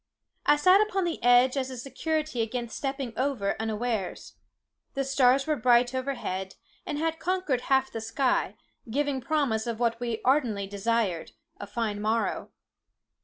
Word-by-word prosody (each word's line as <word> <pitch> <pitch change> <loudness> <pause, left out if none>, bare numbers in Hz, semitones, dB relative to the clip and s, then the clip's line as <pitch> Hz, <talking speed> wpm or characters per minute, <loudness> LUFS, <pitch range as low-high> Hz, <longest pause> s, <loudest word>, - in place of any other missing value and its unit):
I 295 - +7
sat 370 +7 +5
upon 395 -3 0
the 340 -2 -2
edge 245 +2 +5
as 265 -1 -1
a 260 - -7
security 305 +1 -2
against 235 +1 -3
stepping 270 -3 -3
over 255 -7 0
unawares. 220 -2 -3 0.6
The 275 - 0
stars 270 0 +3
were 310 - +1
bright 245 0 +3
overhead, 250 -8 -3 0.3
and 290 - -2
had 325 +1 -1
conquered 365 -9 0
half 265 0 +3
the 225 - -5
sky, 225 +4 0 0.3
giving 280 +2 0
promise 245 -6 0
of 230 -1 -3
what 230 -1 +1
we 235 -2 -2
ardently 245 -7 +2
desired, 200 -3 -1 0.3
a 205 - -6
fine 210 -1 -2
morrow. 220 +2 -1
250 Hz, 150 wpm, -27 LUFS, 225-280 Hz, 0.6 s, I